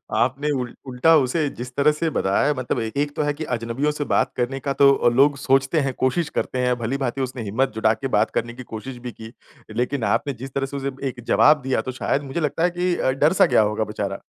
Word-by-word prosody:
आपने 140 +4 +1
उल 125 - -6
उल्टा 130 +6 +4
उसे 145 +3 +1
जिस 125 +1 -7
तरह 145 +2 +4
से 160 +2 -1
बताया 95 +1 +2
है 150 - +2
मतलब 125 -1 -2
एक 110 +5 -5
एक 145 0 -1
तो 150 - 0
है 145 - 0
कि 155 +2 -6
अजनबियों 115 +6 -1
से 150 0 -3
बात - - +2
करने 125 +2 -1
का 140 0 -2
तो 140 -3 +5
लोग 140 +4 +3
सोचते 135 +3 +2
हैं, 135 -2 -1
कोशिश 130 +7 0
करते 130 - -2
हैं। 125 0 +2
भली-भाँति 130 +2 -2
उसने 130 -2 -4
हिम्मत 115 +6 0
जुटा 110 0 +3
के 135 - -4
बात 110 - +2
करने 120 +1 -2
की 130 +1 -9
कोशिश 125 +3 -6
भी 120 - -4
की, 110 +1 -11 0.4
लेकिन 125 +2 -1
आपने 140 -1 -1
जिस 135 - -7
तरह 135 -1 -1
से - - -2
उसे 140 0 -3 0.2
एक 125 -1 -9
जवाब 150 -1 +5
दिया 130 -3 0
तो 130 - -5
शायद 140 - 0
मुझे 135 +5 -4
लगता 150 +1 -1
है 175 - +4
कि 180 0 +1
अ, 130 - +1
डर 150 +5 +2
सा - - +9
गया 120 -3 +4
होगा 110 +1 -1
बेचारा। 100 -1 -4
135 Hz, 245 wpm, -22 LUFS, 120-145 Hz, 0.4 s, सा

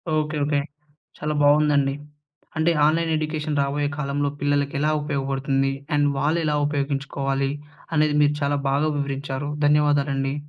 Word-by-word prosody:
Okay. 155 0 -1
Okay. 145 -1 +1 0.6
చాలా 150 0 -2
బాగుందండి. 145 -1 +4 0.6
అంటే 160 +2 +3
ఆన్‌లైన్‌ 165 +1 +2
ఎడ్యుకేషన్ 155 -1 -2
రాబోయే 145 +1 0
కాలంలో 145 0 -1
పిల్లలకి 145 0 0
ఎలా 150 +1 +2
ఉపయోగపడుతుంది? 135 -1 -1 0.2
అండ్ 145 0 +3
వాళ్ళు 150 +5 +1
ఎలా 150 -1 +1
ఉపయోగించుకోవాలి 140 -1 -1 0.4
అనేది 150 0 +3
మీరు 145 0 +2
చాలా 145 0 +1
బాగా 145 +3 +1
వివరించారు. 140 0 -3 0.2
ధన్యవాదాలండి. 145 -2 +2
145 Hz, 125 wpm, -23 LUFS, 140-150 Hz, 0.6 s, బాగుందండి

